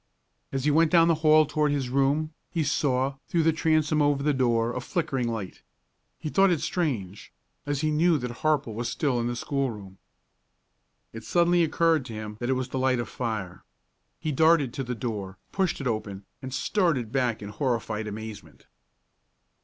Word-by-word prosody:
As 135 0 -2
he 150 - +4
went 160 +2 +4
down 170 -1 +5
the - - +5
hall 155 0 +6
toward 150 0 0
his 135 -3 -1
room, 140 +4 +1 0.2
he 165 -3 -1
saw, 135 -2 0
through 170 -2 +1
the 165 0 +3
transom 155 -1 +2
over 145 -1 +2
the 150 0 +2
door, 120 -3 +1
a 125 - -3
flickering 135 -5 -1
light. 110 -5 -5 0.6
He 160 - -6
thought 195 +4 +4
it 170 -4 +1
strange, 110 - -3 0.4
as 145 -1 -1
he 155 -1 +1
knew 165 +2 +3
that 125 -3 -5
Harple 150 -7 0
was 115 +2 -3
still 135 -5 0
in 120 - -1
the 120 - -2
schoolroom. 115 -8 -3 1.1
It 115 0 -8
suddenly 175 +3 +3
occurred 165 -2 +2
to 115 - -8
him 105 -1 -6
that 120 - -3
it - - +3
was 130 0 -2
the 130 - -3
light 130 -1 +2
of 120 -2 -3
fire. 105 -7 -4 0.6
He 155 - -2
darted 155 -3 +3
to 135 - -3
the 125 0 -4
door, 105 -4 -5
pushed 190 -3 0
it 140 - -5
open, 105 -4 -3 0.2
and 130 -1 -6
started 135 - 0
back 120 -5 0
in 100 - -6
horrified 110 -2 -2
amazement. 110 0 -8
135 Hz, 185 wpm, -26 LUFS, 115-155 Hz, 1.1 s, hall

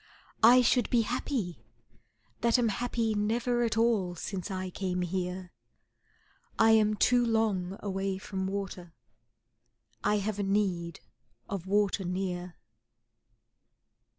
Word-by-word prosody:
I 245 +3 +7
should 245 -1 +2
be 240 - +3
happy, 225 - -3 0.8
that 235 0 +3
am 240 -2 +2
happy 230 +1 -1
Never 235 +4 0
at 225 -2 0
all 215 -6 +2
since 185 +3 -5
I 185 -1 -4
came 180 -1 -2
here. 180 0 -4 1.1
I 225 0 +5
am 215 -1 +4
too 245 +4 +3
long 210 -5 0
away 195 -1 -2
from 190 0 -4
water. 190 -3 -5 1.1
I 210 0 +2
have 205 0 -3
a - - 0
need 190 -5 -1 0.5
of 190 -2 -5
water 200 0 +1
near. 180 -1 -3
200 Hz, 120 wpm, -29 LUFS, 185-225 Hz, 1.1 s, I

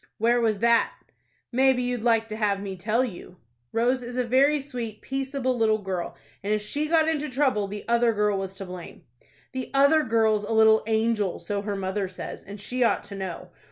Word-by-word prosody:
"Where 235 +2 +3
was 220 -3 +1
that?" 235 +2 +3 0.6
"Maybe 260 0 +3
you'd 245 -1 -2
like 225 -1 +2
to 215 - -4
have 205 -2 0
me 195 -1 -5
tell 220 +7 +1
you." 180 -4 -9 0.3
"Rose 245 +3 +1
is 245 +1 -7
a 250 - +2
very 275 +5 +3
sweet, 240 -6 -6
peaceable 270 -1 -2
little 220 -2 +2
girl, 190 -4 -4 0.3
and 200 - -3
if 215 0 0
she 295 +8 -2
got 320 0 +3
into 300 -2 -1
trouble, 255 -6 +1
the 205 +1 -7
other 235 0 +3
girl 210 -2 +1
was 195 0 -5
to 195 - -7
blame." 180 -1 -9 0.5
"The 260 -1 -5
other 280 +3 +5
girl's 220 -5 +2
a 215 - -3
little 220 0 +6
angel, 220 -3 +1
so 200 +4 -3
her 205 0 -3
mother 195 +1 -2
says, 185 - -8
and 205 +1 -10
she 250 +5 -1
ought 235 - +2
to 205 -1 -9
know. 180 -2 -6
225 Hz, 200 wpm, -26 LUFS, 205-250 Hz, 0.6 s, little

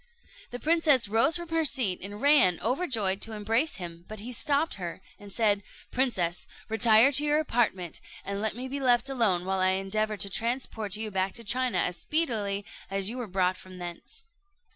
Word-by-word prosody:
The 245 - -6
princess 305 -7 +3
rose 225 +9 +3
from 345 -1 -7
her 325 0 +1
seat, 250 - +1
and 205 +2 -7
ran, 270 - +5
overjoyed, 225 - 0
to 225 - -1
embrace 225 +8 0
him; 170 -2 -8
but 215 -1 -8
he 230 +4 -7
stopped 285 +6 +1
her, 170 -1 -5 0.2
and 205 -1 -12
said, 205 -2 +1 0.3
"Princess, 190 -10 0 0.2
retire 225 +3 +6
to 290 +1 +3
your 295 0 +2
apartment; 220 - -1 0.2
and 200 0 -3
let 220 0 -1
me 255 +2 -5
be 275 +2 -4
left 245 -1 +2
alone, 210 -9 +1
while 190 0 -1
I 185 0 +3
endeavour 215 +2 -2
to 200 - +2
transport 225 -2 -2
you 215 0 -4
back 190 0 -1
to 235 - -9
China 255 +3 0
as 180 - 0
speedily 210 - -1 0.2
as 195 +1 -1
you 250 - -6
were 240 - -4
brought 185 -1 0
from 185 -1 -12
thence." 175 -1 -9
220 Hz, 185 wpm, -28 LUFS, 190-255 Hz, 0.3 s, retire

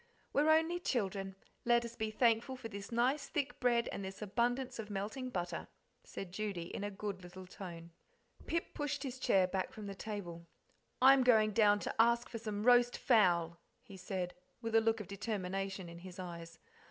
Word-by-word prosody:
"We're 295 +2 +3
only 325 +2 +4
children 195 - -2 0.3
let 235 0 +3
us 235 0 -8
be 220 -1 -2
thankful 230 +3 +2
for 255 -3 -7
this 200 0 -7
nice 255 +5 +1
thick 285 -2 -2
bread 240 -2 +2
and 200 - -5
this 190 0 -6
abundance 245 +5 0
of 215 -1 -5
melting 210 +6 -3
butter," 175 -5 -3 0.4
said 190 -3 -7
Judy, 185 -4 -4
in - - -4
a 205 - -1
good 200 -1 -5
little 180 +1 -10
tone. 170 -2 -9 0.6
Pip 335 +1 -2
pushed 290 -1 -2
his 260 -2 -5
chair 190 -6 +4
back 185 0 -2
from 215 -2 -8
the 200 - -5
table. 180 -5 -6 0.6
"I'm 270 0 +8
going 220 -4 +5
down 205 -1 +5
to - - -3
ask 235 +1 +3
for 230 - -5
some 215 -2 -3
roast 245 0 +5
fowl," 175 -8 +3 0.2
he 195 - -12
said, 180 -1 -4 0.3
with 225 -2 -4
a 225 - +6
look 225 0 +1
of 200 - -8
determination 195 -2 -3
in 170 0 -9
his 185 +1 -10
eyes. 170 -2 -7
210 Hz, 185 wpm, -35 LUFS, 190-240 Hz, 0.6 s, I'm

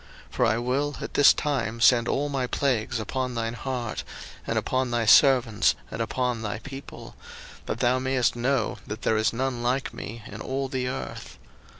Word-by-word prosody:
02:009:014 - - -28
For - - +2
I 110 - +2
will 135 +5 -1
at - - -6
this 145 - +7
time 115 -6 -1
send 120 0 +5
all 145 +4 0
my 135 -3 -1
plagues 125 -5 0
upon 125 +3 -3
thine 115 0 -2
heart, 120 -1 -4 0.4
and - - -1
upon 130 -1 0
thy 120 -1 0
servants, 120 -3 +5 0.2
and 110 - -4
upon 125 0 -1
thy 105 0 -3
people; 135 +3 -10 0.5
that - - -3
thou 125 +1 +3
mayest 130 -2 +1
know 120 0 0
that 110 +2 -6
there 110 - +2
is 110 0 +2
none 125 0 -2
like 125 +2 -1
me 110 +1 -8
in 105 +1 -9
all 135 +1 -2
the 130 -1 -2
earth. 65 - -6
125 Hz, 185 wpm, -26 LUFS, 115-130 Hz, 0.5 s, this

